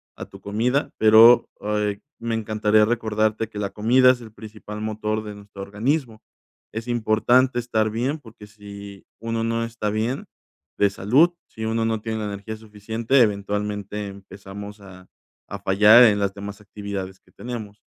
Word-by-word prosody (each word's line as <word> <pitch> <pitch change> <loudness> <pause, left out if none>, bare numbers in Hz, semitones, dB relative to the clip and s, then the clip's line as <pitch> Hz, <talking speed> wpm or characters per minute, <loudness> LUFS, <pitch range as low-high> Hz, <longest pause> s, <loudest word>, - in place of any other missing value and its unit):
a - - -7
tu - - -15
comida, 120 +7 0
pero, 110 +2 +7
ay, 105 -1 -2 0.2
me 115 0 -3
encantaría 110 -1 +2
recordarte 110 -1 0
que 105 - -7
la 100 -1 -2
comida 125 +5 +4
es 125 -1 -4
el 110 -2 -12
principal 105 -1 -9
motor 110 0 -2
de 105 -1 -8
nuestro 100 -1 -12
organismo, 110 +4 -2 0.5
es 110 +2 -6
importante 120 +2 +2
estar 110 -2 0
bien, 125 +7 -1
porque, 115 -5 -14
si 100 -1 -11
uno 115 0 -2
no 115 0 -1
está 115 -2 -3
bien 115 +5 -2 0.5
de 100 - +4
salud, 130 - +3
si 110 - -7
uno 115 +1 0
no 110 -1 -1
tiene 110 0 -3
la 105 - -3
energía 100 +2 -6
suficiente, 110 +4 -1
eventualmente 105 -1 -1
empezamos 100 +1 -10
a 95 -2 -14 0.4
a - - -4
fallar 105 +5 +6
en 105 -4 +5
las 100 0 -1
demás 100 +1 -8
actividades 100 -2 -7
que - - -28
tenemos. 110 -4 -8
110 Hz, 160 wpm, -23 LUFS, 105-115 Hz, 0.5 s, pero